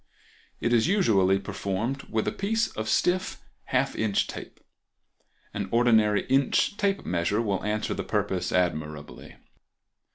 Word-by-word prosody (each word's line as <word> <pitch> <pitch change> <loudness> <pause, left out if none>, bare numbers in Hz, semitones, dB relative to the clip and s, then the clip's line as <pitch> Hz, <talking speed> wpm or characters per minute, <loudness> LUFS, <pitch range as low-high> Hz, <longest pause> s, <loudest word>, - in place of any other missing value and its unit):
It 120 - 0
is 115 +4 +3
usually 105 - +3
performed 100 +7 -3
with 110 -1 -1
a - - +1
piece 225 +3 0
of 110 0 -5
stiff 185 +9 +1 0.3
half - - 0
inch 110 -3 +1
tape; - - -9 0.9
an - - -4
ordinary 110 -4 +3
inch 135 +8 +2
tape 200 -1 -1
measure 85 +4 0
will 100 -4 -1
answer 105 0 -1
the - - -4
purpose 90 -1 -1
admirably. 75 -4 -3
110 Hz, 130 wpm, -26 LUFS, 95-135 Hz, 0.9 s, is